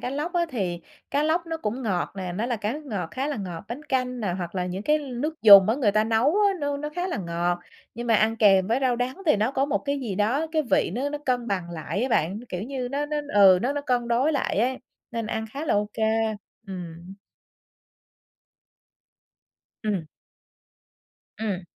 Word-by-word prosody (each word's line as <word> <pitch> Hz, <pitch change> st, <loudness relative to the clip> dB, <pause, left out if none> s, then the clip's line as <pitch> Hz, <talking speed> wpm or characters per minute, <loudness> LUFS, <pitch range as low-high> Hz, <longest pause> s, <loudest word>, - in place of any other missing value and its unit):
cá 250 Hz, -, -3 dB
lóc 300 Hz, +6 st, -3 dB
á 345 Hz, -1 st, +1 dB
thì 185 Hz, -9 st, -2 dB, 0.3 s
cá 285 Hz, -, +1 dB
lóc 330 Hz, +2 st, +1 dB
nó 325 Hz, -, -3 dB
cũng 250 Hz, -3 st, -3 dB
ngọt 190 Hz, -6 st, -1 dB
nè, 185 Hz, -2 st, -4 dB
nó 215 Hz, +6 st, -2 dB
là 245 Hz, -, -1 dB
cá 215 Hz, +1 st, -2 dB
nước 300 Hz, +1 st, -7 dB
ngọt 195 Hz, -, -3 dB
khá 265 Hz, +2 st, -2 dB
là 295 Hz, -3 st, -2 dB
ngọt, 180 Hz, -4 st, -6 dB
bánh 250 Hz, +6 st, -6 dB
canh 255 Hz, -3 st, -1 dB
nè 195 Hz, -5 st, -1 dB
hoặc 175 Hz, -1 st, -5 dB
là 180 Hz, -1 st, -1 dB
những 185 Hz, +3 st, -4 dB
cái 300 Hz, +4 st, +3 dB
nước 290 Hz, +3 st, -4 dB
dùng 200 Hz, -2 st, +10 dB
á 225 Hz, -, +3 dB
người 235 Hz, -7 st, +2 dB
ta 215 Hz, +1 st, +3 dB
nấu 225 Hz, +2 st, +2 dB, 0.2 s
á, 400 Hz, -, +3 dB
nó 285 Hz, 0 st, -1 dB
nó 295 Hz, +1 st, -4 dB
khá 360 Hz, +1 st, -1 dB
là -, -, -2 dB
ngọt. 175 Hz, -1 st, -1 dB, 0.4 s
Nhưng 240 Hz, +1 st, -5 dB
mà 230 Hz, -, +3 dB
ăn 220 Hz, +1 st, +3 dB
kèm 195 Hz, -4 st, +5 dB
với 230 Hz, +4 st, +1 dB
rau 255 Hz, -3 st, +2 dB
đắng 255 Hz, +10 st, -3 dB
thì 300 Hz, -, +5 dB
nó 215 Hz, +4 st, +1 dB
có 270 Hz, -1 st, +1 dB
một 285 Hz, -, 0 dB
cái 280 Hz, 0 st, -2 dB
gì 225 Hz, -7 st, -3 dB
đó, 235 Hz, +11 st, +1 dB
cái 315 Hz, -1 st, +2 dB
vị -, -, +3 dB
nó 270 Hz, +4 st, -1 dB
nó 295 Hz, -, -4 dB
cân 250 Hz, -4 st, -1 dB
bằng 180 Hz, -3 st, -2 dB
lại 165 Hz, +4 st, -3 dB
á 260 Hz, -, 0 dB
bạn. 190 Hz, 0 st, +1 dB
Kiểu 180 Hz, +1 st, -4 dB
như, 255 Hz, 0 st, -4 dB
nó 285 Hz, +3 st, -2 dB
nó 300 Hz, 0 st, -2 dB, 0.2 s
ừ, 190 Hz, -3 st, +7 dB
nó 265 Hz, +3 st, +1 dB
nó 290 Hz, -, -2 dB
cân 245 Hz, -4 st, 0 dB
đối 260 Hz, +7 st, +2 dB
lại 270 Hz, -7 st, 0 dB
ấy, 255 Hz, +3 st, +1 dB, 0.3 s
nên 230 Hz, -2 st, -3 dB
ăn 220 Hz, 0 st, -2 dB
khá 285 Hz, +3 st, -4 dB
là -, -, +2 dB
ô 205 Hz, 0 st, +1 dB
kê, 220 Hz, -, -4 dB, 0.6 s
ừm. 175 Hz, -1 st, -8 dB, 2.7 s
Ừm. 200 Hz, -7 st, -1 dB, 1.3 s
Ừm. 205 Hz, -4 st, -2 dB
235 Hz, 220 wpm, -25 LUFS, 195-280 Hz, 2.7 s, dùng